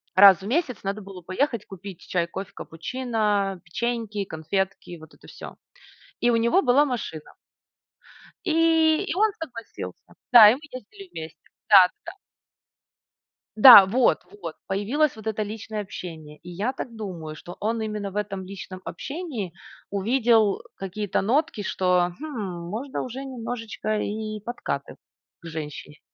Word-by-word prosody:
Раз 195 -1 +8
в 195 - -7
месяц 255 - -1
надо 200 +2 -3
было 195 -2 -10
поехать 210 - -1
купить 195 -2 -9
чай, 175 -2 -1
кофе, 190 +3 -7
капучино, 210 0 -2
печеньки, 220 +2 -2
конфетки 185 +3 -3
и 175 - -7
вот 160 0 -15
это - - -18
всё. - - -10 0.7
И 240 - +3
у 230 - +3
него 235 +12 +3
была 265 +3 +4
машина. 225 - -5 1.1
И 325 0 +3
и 345 - -3
он 430 +2 +3
согласился. 240 -8 -8 0.2
Да, 220 -4 +11
и - - +1
мы - - -10
ездили 390 +10 -11
вместе. 160 0 -8 0.3
Да-да-да. 195 - +5 1.4
Да 215 -3 +11
вот 235 +6 +3 0.2
вот! 165 -3 -6
Появилось 230 +10 0
вот 220 0 -9
это 215 0 -1
личное 215 0 -5
общение. 160 -6 -9
И 180 - -10
я 200 +9 -2
так 235 -3 -7
думаю, 170 -8 -6
что 175 +3 -11
он 225 +1 -1
именно 210 -2 -4
в - - -14
этом 195 -2 -3
личном 185 -1 -9
общении 235 - -5 0.4
увидел 220 0 +2
какие-то 195 +1 -2
нотки, 260 +2 0
что: 180 -2 +1
"Хм, 200 - -5
можно 255 +8 -4
уже 255 +2 -6
немножечко 230 -4 -4
и 215 0 -4
подкатывать 240 +4 -5 0.4
к 170 - -16
женщине". 150 -1 -7
210 Hz, 140 wpm, -25 LUFS, 185-245 Hz, 1.4 s, Да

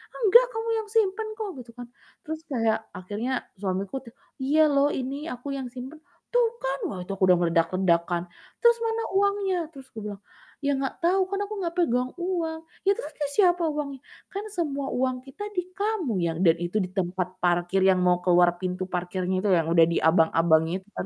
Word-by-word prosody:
"Enggak. 475 +2 +6
Kamu 450 +1 -3
yang 435 - -6
simpan 435 0 +2
kok!" 435 -2 -3
Gitu 240 -1 -11
kan. 245 -1 -8 0.4
Terus 315 0 -5
kayak 225 -4 +2 0.2
akhirnya 210 +7 -4 0.3
suamiku 195 +2 -2
tuh, 230 - -13 0.3
"Iya 295 +4 +3
loh 280 0 +4
ini 265 +1 -3 0.2
aku 250 +3 -9
yang 265 -2 -4
simpen." 260 +4 -8 0.3
"Tuh 485 -1 +5
kan!" 270 +1 -2
Wah, 190 - -5
itu 195 - -6
aku 190 - -2
udah 180 - +7
meledak-ledak 170 +1 +2
kan, 175 -1 0 0.4
"Terus 470 -1 +6
mana 450 0 0
uangnya?" 400 -1 +2 0.2
Terus 270 -4 -12
aku 225 - -7
bilang, 205 -1 -6 0.4
"Iya 285 - +3
enggak 270 - -2
tau, 370 +3 +3
kan 395 - -1
aku 430 - -7
gak 335 0 -3
pegang 250 -7 +2
uang." 335 -3 -1 0.2
"Iya 395 - +4
terus 300 +1 -6
ke 295 - 0
siapa 360 -3 +4
uangnya?" 280 -3 -4 0.3
"Kan 400 +2 -4
semua 285 -5 -1
uang 255 0 +1
kita 270 +9 -8
di - - +3 0.2
kamu, 400 - 0
Yang." 165 -1 -1
Dan 165 -1 +6
itu 175 +5 -2
di - - -10
tempat 180 0 0
parkir 175 +2 +2
yang 185 -1 +4
mau 180 0 +4
ke 180 - 0
luar 175 0 +6
pintu 185 0 -2
parkirnya 180 +1 -1
itu - - +3
yang 165 -1 0
udah 165 -1 +7
di - - +1
abang-abangnya 160 0 +4
itu 190 - -27
kan. - - -3
255 Hz, 200 wpm, -26 LUFS, -, 0.4 s, udah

